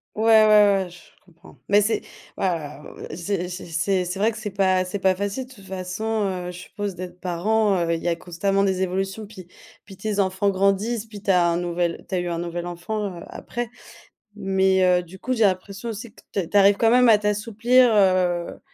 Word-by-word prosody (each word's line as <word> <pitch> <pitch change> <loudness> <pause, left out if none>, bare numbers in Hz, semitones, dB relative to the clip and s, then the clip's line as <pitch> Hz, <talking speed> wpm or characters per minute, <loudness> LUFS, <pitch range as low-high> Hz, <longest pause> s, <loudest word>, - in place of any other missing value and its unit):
Ouais, 215 - -2
ouais, 210 -3 +6
ouais, - - -10
je 175 0 -14 0.2
comprends. 165 -5 -19
Mais 205 +1 +6
c'est 210 +2 +1 0.4
ouais, - - -1
ouais, 165 -4 -3 0.4
heu, - - -7
j'ai 180 +1 -3
j'ai 180 +1 -7
c'est 180 +3 0
c'est 180 +2 -5
vrai 220 +3 +2
que - - -9
c'est 215 -1 -4
pas 190 -1 +2 0.3
facile. 200 +7 -3
De 260 - -15
toute 200 -6 -16
façon, 185 +1 -5 0.4
heu, - - -4
je 175 - -10
suppose, 205 +1 -5
d'être 180 0 -9
parent, 200 +3 +1
heu, 170 - +1
il 165 - -3
y 175 - +1
a 170 - +1
constamment 195 +3 0
des 190 -1 0
évolutions, 195 +3 -2
puis 190 -4 -12 0.4
puis 195 - -12
tes 205 +1 -3
enfants 190 +1 +1
grandissent, 200 +4 +1
puis 210 -2 -11
tu 200 - +2
as 180 -2 +4
un 170 +1 -1 0.4
tu - - -11
as - - +1
eu 175 - -3
un 170 -1 -2
nouvelle 175 0 -4
enfant, 180 +2 -4
heu, - - -9
après. 240 -1 -5 0.7
Mais, 190 -2 +2
heu, 180 -1 +4
du 175 +2 -13
coup, 255 +7 -2
j'ai 230 -3 +2
l'impression 195 +3 -1
aussi 225 0 -7
que - - -18
ta 195 -3 -1
tu 185 - -10
arrives 200 0 +6
quand 225 +1 +3
même 250 0 +5
à 220 - +7
t'assouplir, 225 +4 +2
heu, 185 -3 +2
195 Hz, 215 wpm, -23 LUFS, 180-210 Hz, 0.7 s, à